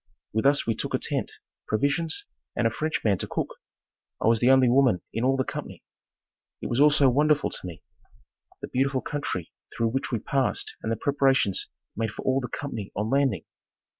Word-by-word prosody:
With 110 +5 +2
us 145 0 +3
we 115 - +1
took - - -2
a - - +3
tent, - - -2 0.4
provisions 145 +8 0 0.3
and 120 - 0
a 115 - +3
French 155 +6 -2
man 100 -4 +2
to - - -3
cook. - - -3 0.6
I - - -2
was 115 0 +4
the 125 - +4
only 130 -1 +6
woman 125 -6 +3
in 115 - -1
all 135 +1 +3
the 130 - +2
company. - - -7 0.8
It - - -5
was 120 +4 +2
all 150 - +8
so 145 -2 +4
wonderful 150 +3 +3
to - - -3
me 85 - -9 0.8
the - - -3
beautiful 135 0 0
country 115 - -4 0.2
through 115 0 0
which 135 +4 -2
we 120 - +1
passed 135 +4 -1
and 110 - -2
the - - +1
preparations 135 -5 +2 0.3
made 110 +1 -1
for 105 - -8
all 130 +1 +2
the 125 - -4
company 115 -6 -5
on 105 +3 -2
landing. 135 - +1
130 Hz, 195 wpm, -26 LUFS, 110-140 Hz, 0.8 s, all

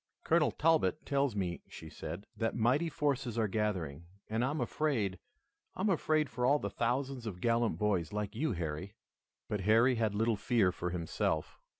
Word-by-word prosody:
"Colonel 160 -2 +3
Talbot 160 -1 +2
tells 140 -4 +1
me," 90 -4 -2
she 80 - -9
said, 90 +5 -7
"that 115 -1 -1
mighty 125 +9 +2
forces 135 -6 -1
are 110 -2 +2
gathering, 90 -7 -2 0.2
and 110 +2 0
I 130 - +2
am 150 +2 -2
afraid, 120 -7 0 0.6
I - - -4
am 205 - +2
afraid 155 -3 +2
for 125 0 -4
all 140 +4 +5
the - - -4
thousands 125 +1 -1
of 90 -4 -5
gallant 115 +2 +1
boys 95 -7 0
like 105 -1 -3
you, 155 -4 0
Harry." 85 +3 -4 0.5
But 105 -2 -2
Harry 115 +6 +5
had 110 -2 0
little 110 +1 +2
fear 105 -3 +2
for 90 0 -3
himself. 80 -2 -2
115 Hz, 180 wpm, -33 LUFS, 95-135 Hz, 0.6 s, all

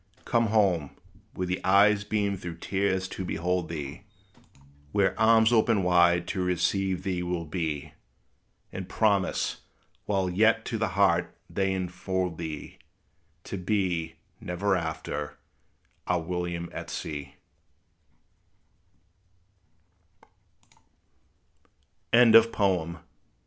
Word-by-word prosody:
Come 115 -1 +2
home, 95 -9 +1 0.4
where 90 - -2
the 90 +1 -3
eyes 100 +2 +5
beam 105 -2 -1
through 85 -3 -7
tears 95 +1 -1
to 95 - -5
behold 90 -1 -1
thee; 70 -4 -6 0.9
Where 100 -2 +3
arms 110 +1 +5
open 110 -3 +3
wide 85 -1 +4
to 95 -2 -1
receive 95 +1 0
thee 90 -2 -2
will 90 -1 -3
be; 80 -2 -4 0.8
And 95 -1 -6
promise, 100 -4 +1 0.5
while 95 -2 0
yet 110 +5 +3
to 115 - -3
the 110 - +1
heart 85 -3 +2
they 95 -1 -1
infold 95 -1 -3
thee 80 -3 -6 0.6
To 100 - -5
be, 90 -4 -1 0.2
never 95 0 -1
after, 80 -3 -4 0.7
our 90 -1 +2
William 85 0 -4
at - - -6
sea! 75 -2 -6
90 Hz, 95 wpm, -27 LUFS, 85-100 Hz, 0.9 s, eyes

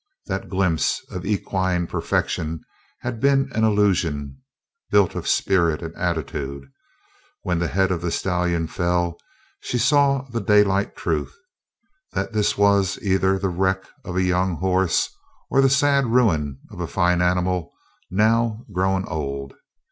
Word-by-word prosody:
That 95 -1 -4
glimpse 95 -5 0
of 90 +1 -5
equine 95 -3 0
perfection 80 -1 -2 0.4
had 120 -2 -4
been 135 +1 +2
an 110 - 0
illusion 90 -10 +1 0.5
built 100 -3 +3
of - - -5
spirit 85 -4 +2
and 80 0 -7
attitude; 75 -5 -3 0.8
when 90 -2 0
the 85 - 0
head 95 +1 +1
of 85 -3 -1
the 85 - -1
stallion 90 -2 0
fell 85 0 -1 0.4
she 125 - -3
saw 140 +2 +3
the 115 -1 -2
daylight 100 -1 +3
truth: 80 -4 -2 0.8
that - - -2
this 105 -1 +1
was 100 -1 +3
either 95 -1 +2
the 95 0 -1
wreck 95 +1 0 0.2
of 90 - -6
a 95 - +2
young 90 0 +1
horse 95 0 +1 0.4
or 135 - +4
the 135 - +4
sad 140 -1 +3
ruin 85 - +2
of - - -10
a - - -2
fine 90 0 +1
animal 90 -1 0 0.4
now 110 +3 +1
grown 95 +1 +1
old. 70 -3 -4
95 Hz, 140 wpm, -22 LUFS, 85-105 Hz, 0.8 s, or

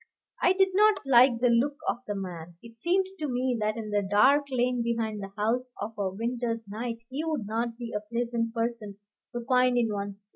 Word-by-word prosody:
I 365 - +5
did 385 0 +3
not 420 +1 +5
like 250 -2 +6
the 250 - +4
look 260 +5 +2
of - - +1
the 205 - -2
man. 175 -3 -7
It 230 -1 -13
seemed 355 +10 +1
to 305 - -2
me 250 -1 0
that 215 +1 -1
in 215 -2 -5
the 205 0 +2
dark 260 +9 +4
lane 250 -1 +1
behind 225 -3 -2
the 195 0 -7
house 245 +4 -1
of 225 - -4
a 200 -2 -1
winter's 230 +2 -3
night 230 +3 -5
he 285 +4 -3
would 310 -9 -2
not 230 +2 -2
be 240 -1 -6
a - - +1
pleasant 235 -1 -1
person 230 -3 -3 0.4
to 240 -1 -4
find 250 -1 +3
in 230 -3 +1
one's 200 0 -5
way. - - -33
235 Hz, 215 wpm, -28 LUFS, 210-255 Hz, 0.4 s, like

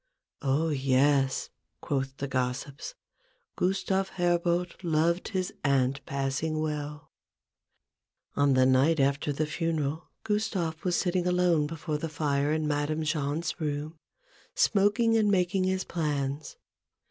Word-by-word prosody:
" - - -65
Oh, 145 +4 +1
yes," 135 -1 +2 0.3
(quoth 135 -1 -2
the 140 - -3
gossips), 130 - -3 0.3
" - - -42
Gustave 190 +1 0
Herbout 175 0 +1
loved 170 +1 +1
his 185 -3 -2
aunt 135 -1 +1
passing 140 +3 -1
well! 150 -1 -4 0.6
" - - -50
On 140 -2 +3
the 130 0 +5
night 135 +5 +4
after 140 +2 +1
the 150 +2 -1
funeral, 160 -1 -2
Gustave 200 -7 -1
was 180 -2 +1
sitting 180 -1 0
alone 180 -4 +3
before 155 -1 -4
the 165 - -3
fire 145 -1 0
in 155 0 0
Madame 150 +2 -1
Jahn's 155 +2 -2
room, 150 +1 -3 0.6
smoking 225 - +3
and 215 -2 +3
making 185 -1 +2
his 185 0 0
plans. 145 -3 -3
155 Hz, 130 wpm, -28 LUFS, 140-180 Hz, 0.6 s, the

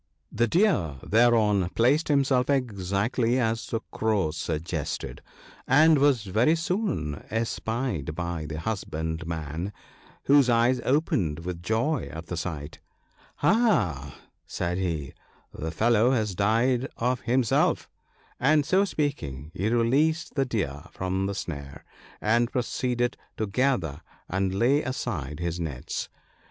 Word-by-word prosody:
The 120 +2 +1
Deer 155 - +2
thereon 110 -5 +3
placed 135 +8 +3
himself 135 -3 +2
exactly 115 -1 0
as 115 -2 0
the 115 - -2
Crow 105 -8 0
suggested, 80 0 -4 0.5
and 155 +3 +6
was 135 -5 +3
very 110 - +3
soon 165 - -2
espied 115 - -2
by 85 -2 -3
the 80 0 -5
husbandman, 80 -2 -3 0.5
whose 140 -2 +5
eyes 120 +2 +3
opened 95 - +1
with 90 -2 -4
joy 115 - 0
at 80 +1 -7
the 90 - -5
sight. 80 -3 -5 0.4
" - - -27
Aha! 95 - +2 0.2
" - - -50
said 90 +1 -2
he, 80 -7 -2 0.2
" - - -34
the 80 - -4
fellow 115 +7 +3
has 110 -6 +1
died 115 +7 +2
of 125 +1 0
himself," 125 -1 +2 0.5
and 150 +2 +3
so 190 +5 +3
speaking, 80 - -3
he 100 +5 -1
released 135 +8 +2
the 135 -2 +1
Deer 80 - -3
from 95 +1 -2
the 100 - -3
snare, 70 -6 -6 0.3
and 120 +3 +2
proceeded 125 -1 -1 0.2
to 110 - 0
gather 100 - 0 0.3
and 95 0 -1
lay 130 +8 +3
aside 85 - -4
his 85 0 -2
nets. 75 -7 -4
110 Hz, 130 wpm, -26 LUFS, 85-130 Hz, 0.5 s, and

